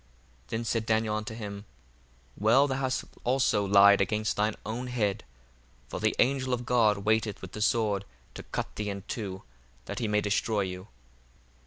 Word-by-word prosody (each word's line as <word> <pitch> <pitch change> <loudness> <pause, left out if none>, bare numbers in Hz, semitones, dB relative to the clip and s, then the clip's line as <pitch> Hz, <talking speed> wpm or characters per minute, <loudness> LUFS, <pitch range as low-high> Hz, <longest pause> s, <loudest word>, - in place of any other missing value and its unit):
1:59 - - -33
Then 115 +1 -3
said 115 -1 -1
Daniel 110 -1 +1
unto 110 +1 -4
him, 100 -2 -7 0.7
Well; 115 +7 +4
thou 135 -1 -1
hast 130 -1 -1 0.2
also 125 -5 +2
lied 100 0 +6
against 105 +2 0
thine 105 +1 +1
own 120 +4 -4
head: 110 -6 -1 0.7
for - - -4
the - - +1
angel 130 -1 +2
of 120 0 -8
God 110 -5 +2
waiteth 110 -1 +1
with - - -9
the 105 - -6
sword 105 -3 +1 0.3
to - - -7
cut - - -5
thee 105 -1 -2
in 100 -1 -5
two, 95 -5 -5 0.4
that - - -5
he 115 - -1
may 105 0 +2
destroy 105 +1 0
you. 90 0 -5
110 Hz, 175 wpm, -28 LUFS, 100-115 Hz, 0.7 s, lied